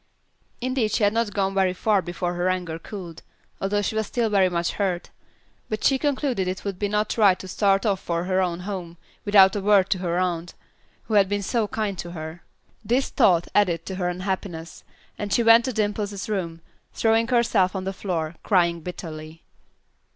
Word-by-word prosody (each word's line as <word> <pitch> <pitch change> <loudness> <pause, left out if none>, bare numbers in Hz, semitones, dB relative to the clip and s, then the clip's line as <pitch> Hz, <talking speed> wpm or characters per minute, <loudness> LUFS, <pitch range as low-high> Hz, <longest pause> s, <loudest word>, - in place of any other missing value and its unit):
Indeed 255 -3 0
she - - +1
had 205 0 +3
not 230 -2 0
gone 195 -1 0
very 190 -2 +2
far 205 +2 +2
before 175 0 -3
her 175 +1 0
anger 180 -3 -2
cooled, 175 -3 -9 0.4
although 205 +1 0
she - - -1
was 220 -1 -1
still 230 -3 -1
very 195 -2 +4
much 170 -1 -1
hurt; 185 -4 -2 0.6
but 215 - -3
she 270 -1 +3
concluded 265 -9 0
it 185 +2 -4
would 195 -1 -4
not 210 +1 0
be 225 - -1
right 195 -3 +6
to 190 - -9
start 195 +2 +2
off 200 -3 +1
for 170 -2 -2
her 185 +1 +1
own 175 -1 -1
home 180 -3 -6 0.3
without 195 -2 +6
a 205 - -1
word 200 -1 +4
to 190 - +2
her 175 -1 -1
aunt, 175 -1 -2 0.5
who 220 - -6
had 200 -2 +4
been 205 0 -1
so 220 +2 0
kind 205 -3 -3
to 175 0 -6
her. 160 +1 -7 0.4
This 245 +6 +1
thought 180 -9 +3
added 175 -5 +2
to 190 - -5
her 180 -2 0
unhappiness, 180 -2 -5 0.4
and 205 -1 -4
she 235 - +3
went 230 +1 +7
to 260 - -1
Dimple's 205 -2 -2
room, 170 -6 -3 0.3
throwing 225 0 +2
herself 225 -6 +2
on 190 - -3
the 195 +1 -3
floor, 170 -5 -3
crying 170 -4 +2
bitterly. 160 -2 -8
195 Hz, 195 wpm, -24 LUFS, 175-210 Hz, 0.6 s, went